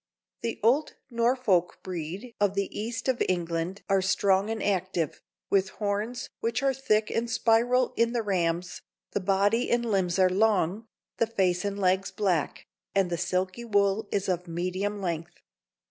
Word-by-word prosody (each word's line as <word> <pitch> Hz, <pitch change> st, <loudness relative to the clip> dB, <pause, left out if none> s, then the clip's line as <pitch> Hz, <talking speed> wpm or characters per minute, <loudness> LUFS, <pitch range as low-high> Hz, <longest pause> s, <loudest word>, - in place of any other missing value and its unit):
The 230 Hz, -, -3 dB
old 265 Hz, +7 st, +3 dB, 0.2 s
Norfolk 235 Hz, -7 st, +2 dB
breed 185 Hz, +6 st, -5 dB
of 200 Hz, -1 st, +2 dB
the 200 Hz, -1 st, -2 dB
east 225 Hz, +4 st, -4 dB
of 260 Hz, -2 st, +1 dB
England 175 Hz, +1 st, -2 dB
are 195 Hz, -1 st, +3 dB
strong 190 Hz, +1 st, +2 dB
and 225 Hz, -1 st, -2 dB
active, 185 Hz, -5 st, -1 dB, 0.3 s
with 195 Hz, -1 st, +3 dB
horns, 210 Hz, +4 st, -2 dB
which 230 Hz, +4 st, -1 dB
are 270 Hz, -1 st, +3 dB
thick 215 Hz, -5 st, +1 dB
and 230 Hz, +1 st, -1 dB
spiral 235 Hz, +3 st, +3 dB
in 230 Hz, 0 st, +2 dB
the 235 Hz, -2 st, -1 dB
rams; 180 Hz, -3 st, -1 dB, 0.3 s
the -, -, 0 dB
body 200 Hz, +5 st, +2 dB
and 240 Hz, 0 st, +2 dB
limbs 190 Hz, -5 st, +1 dB
are 185 Hz, -1 st, +5 dB
long, 200 Hz, +1 st, +1 dB, 0.3 s
the 230 Hz, -, +2 dB
face 185 Hz, -5 st, +1 dB
and 200 Hz, 0 st, -2 dB
legs 190 Hz, 0 st, +2 dB
black, 185 Hz, -8 st, -1 dB, 0.3 s
and 190 Hz, -3 st, +2 dB
the -, -, +1 dB
silky 185 Hz, +5 st, -1 dB
wool 205 Hz, -1 st, +1 dB
is 200 Hz, 0 st, 0 dB
of 180 Hz, -1 st, -1 dB
medium 185 Hz, +4 st, -2 dB
length. 170 Hz, -2 st, -4 dB
200 Hz, 160 wpm, -27 LUFS, 185-225 Hz, 0.3 s, are